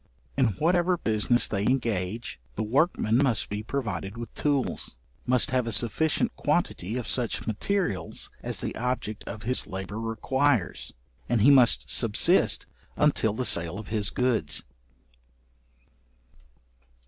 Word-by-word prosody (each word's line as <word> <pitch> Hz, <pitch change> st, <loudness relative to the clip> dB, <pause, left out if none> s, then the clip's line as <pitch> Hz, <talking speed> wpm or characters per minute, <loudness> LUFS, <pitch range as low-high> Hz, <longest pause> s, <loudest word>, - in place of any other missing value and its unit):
In 130 Hz, -2 st, +3 dB
whatever 175 Hz, +2 st, +2 dB
business 115 Hz, -3 st, +1 dB
they 100 Hz, -, -2 dB
engage, 115 Hz, -, -2 dB, 0.2 s
the -, -, -2 dB
workman 120 Hz, -, +1 dB
must 130 Hz, -5 st, +1 dB
be 105 Hz, +1 st, -4 dB
provided 105 Hz, -5 st, -4 dB
with 115 Hz, -1 st, -8 dB
tools, 140 Hz, -, -2 dB, 0.3 s
must 125 Hz, -1 st, +3 dB
have 125 Hz, -2 st, 0 dB
a -, -, -2 dB
sufficient 120 Hz, +9 st, 0 dB
quantity 105 Hz, +8 st, -1 dB
of 120 Hz, -4 st, -5 dB
such 120 Hz, -3 st, -1 dB
materials 110 Hz, -, -2 dB
as -, -, -3 dB
the -, -, -4 dB
object 120 Hz, -3 st, -3 dB
of 105 Hz, -, -8 dB
his 125 Hz, +3 st, +1 dB
labour 95 Hz, +3 st, -6 dB
requires: 120 Hz, +1 st, -1 dB, 0.4 s
and 120 Hz, -2 st, +1 dB
he 135 Hz, +7 st, +6 dB
must 120 Hz, -, +5 dB
subsist -, -, +5 dB, 0.3 s
until 130 Hz, -8 st, +2 dB
the 125 Hz, +3 st, -3 dB
sale 85 Hz, -1 st, +3 dB
of 110 Hz, -, -9 dB
his 105 Hz, -1 st, 0 dB
goods. 125 Hz, -3 st, 0 dB
115 Hz, 130 wpm, -26 LUFS, 105-130 Hz, 0.4 s, he